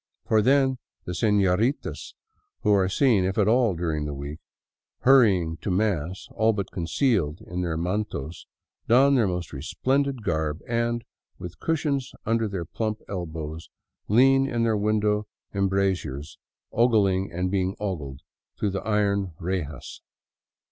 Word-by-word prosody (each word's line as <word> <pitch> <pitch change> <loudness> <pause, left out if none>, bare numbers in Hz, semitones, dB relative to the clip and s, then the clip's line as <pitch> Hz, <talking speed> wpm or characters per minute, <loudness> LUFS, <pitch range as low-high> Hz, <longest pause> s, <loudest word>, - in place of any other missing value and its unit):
For 110 -1 +3
then 130 +1 +3 0.3
the 90 - -4
senoritas 105 - +1 0.5
who 105 -3 +3
are 95 -2 +3
seen, 110 -2 +3
if 95 +1 -1
at 105 -2 +3
all, 115 -3 +3
during 80 -3 -2
the 75 -1 -4
week, 70 +3 -6 0.6
hurrying 100 -11 +4
to - - -5
mass 95 -3 -1
all 110 +1 +2
but 100 -3 -4
concealed 85 - 0
in 90 +1 -5
their 85 -3 -1
mantos, 90 -3 -3 0.4
don 135 +4 +5
their 120 -6 +3
most 90 -3 -4
resplendent 130 - -1
garb 80 -3 -1
and, 120 0 0 0.3
with 90 -1 -9
cushions 145 -5 -1
under 115 0 +1
their 95 -4 -4
plump 110 +5 -3
elbows, 80 -4 -5 0.4
lean 135 +5 +5
in 120 -2 0
their 115 -1 +2
window 105 0 +1 0.3
embrazures 95 -7 -1 0.3
oggling 100 -5 +3
and 90 +2 -2
being 95 0 0
oggled 75 -10 -4 0.4
through 105 - 0
the 95 0 -3
iron 100 -4 0
rejas. 85 -6 -4
100 Hz, 135 wpm, -25 LUFS, 85-115 Hz, 0.6 s, don